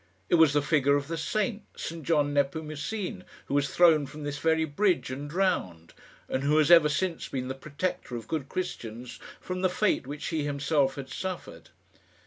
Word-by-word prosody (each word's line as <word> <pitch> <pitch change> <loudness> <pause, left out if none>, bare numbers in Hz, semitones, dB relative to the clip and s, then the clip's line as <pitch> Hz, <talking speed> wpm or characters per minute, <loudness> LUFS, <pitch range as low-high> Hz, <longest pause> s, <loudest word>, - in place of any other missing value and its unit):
It - - 0
was 155 -3 +6
the 145 -1 +2
figure 145 -2 +3
of 145 -1 -1
the 165 - -2
saint, 210 +6 -1 0.2
St 165 0 -5
John 145 -2 +2
Nepomucene, 160 +8 -2 0.2
who - - -5
was 145 0 +2
thrown 160 -5 +5
from 150 +2 -9
this 145 0 -4
very 160 0 +2
bridge 170 0 +1
and 140 +3 -5
drowned, 95 - -1 0.3
and 130 - -1
who 145 +2 +2
has 155 +1 +4
ever 165 -3 +8
since 170 +3 -1
been 130 -1 -4
the - - -2
protector 140 -1 -4
of 115 -2 -6
good 150 -4 -3
Christians 120 -9 -5 0.2
from 185 0 -4
the 185 - +3
fate 185 -7 +1
which 145 +1 -5
he 160 -2 -1
himself 140 -1 +1
had 135 -1 -7
suffered. 185 -1 -6
150 Hz, 185 wpm, -28 LUFS, 140-170 Hz, 0.3 s, ever